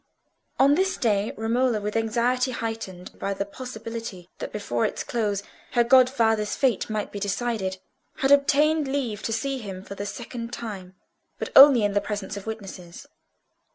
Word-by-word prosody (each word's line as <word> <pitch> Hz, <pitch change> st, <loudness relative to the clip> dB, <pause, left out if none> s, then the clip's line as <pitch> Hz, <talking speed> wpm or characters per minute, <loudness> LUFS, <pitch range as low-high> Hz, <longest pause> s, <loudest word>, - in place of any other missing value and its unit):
On 275 Hz, +2 st, +5 dB
this 380 Hz, +5 st, +1 dB
day 210 Hz, -4 st, +1 dB
Romola, 230 Hz, +1 st, +1 dB
with 210 Hz, +1 st, -4 dB
anxiety 240 Hz, +3 st, +1 dB
heightened 225 Hz, -7 st, -6 dB
by 200 Hz, 0 st, -2 dB
the 200 Hz, -, -2 dB
possibility 225 Hz, -4 st, -7 dB
that -, -, -5 dB
before 120 Hz, -, -2 dB
its -, -, -1 dB
close 205 Hz, -4 st, -1 dB, 0.3 s
her 240 Hz, -, +4 dB
godfather's 235 Hz, -4 st, +3 dB
fate 255 Hz, -8 st, +1 dB
might 215 Hz, -1 st, -3 dB
be 205 Hz, -, -5 dB
decided, 200 Hz, -1 st, -2 dB, 0.4 s
had 270 Hz, -, +1 dB
obtained 290 Hz, +2 st, +4 dB
leave 255 Hz, -6 st, -2 dB
to -, -, -3 dB
see 270 Hz, +4 st, -1 dB
him 190 Hz, -4 st, -7 dB
for 200 Hz, -, -8 dB
the 200 Hz, +1 st, -5 dB
second 235 Hz, +1 st, -6 dB
time, 195 Hz, -7 st, -7 dB, 0.4 s
but -, -, -4 dB
only 270 Hz, -5 st, +9 dB
in 205 Hz, -, +2 dB
the 205 Hz, -, +2 dB
presence 205 Hz, -1 st, -4 dB
of 200 Hz, +1 st, -8 dB
witnesses. 195 Hz, -1 st, -8 dB
225 Hz, 160 wpm, -25 LUFS, 200-255 Hz, 0.4 s, only